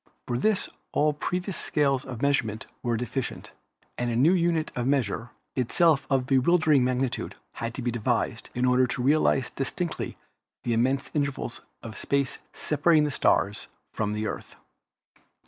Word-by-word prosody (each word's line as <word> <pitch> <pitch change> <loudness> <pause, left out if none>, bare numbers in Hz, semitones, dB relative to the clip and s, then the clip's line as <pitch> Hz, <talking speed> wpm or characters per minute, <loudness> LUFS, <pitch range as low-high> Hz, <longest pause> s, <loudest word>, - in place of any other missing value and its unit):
For 120 -1 -1
this 215 +3 +2 0.3
all 150 0 +3
previous 180 +5 -2
scales 140 -4 +1
of 125 -2 -6
measurement 115 -7 +1 0.2
were 120 -2 0
deficient, 125 +2 -4 0.5
and 120 0 0
a 115 - -1
new 145 +9 +5
unit 170 -3 +1
of 125 0 -1
length, 120 -4 0 0.3
itself 140 +4 +3
of 135 -2 +2
bewildering 145 +1 +4
magnitude, 130 0 -1 0.2
had 115 0 -5
to - - -4
be 120 - 0
devised 115 -2 -1
in 125 +1 +1
order 125 0 +4
to 125 - -3
realize 135 -2 +3
distinctly 165 +5 -3 0.5
the 120 - 0
immense 130 +4 +1
intervals 140 -5 -2 0.2
of 110 -2 -7
space 140 -2 0
separating 155 +1 +3
the 150 - 0
stars 100 -5 +1 0.3
from 105 -1 -1
the 105 +1 -2
Earth. - - -5
130 Hz, 150 wpm, -27 LUFS, 120-150 Hz, 0.5 s, new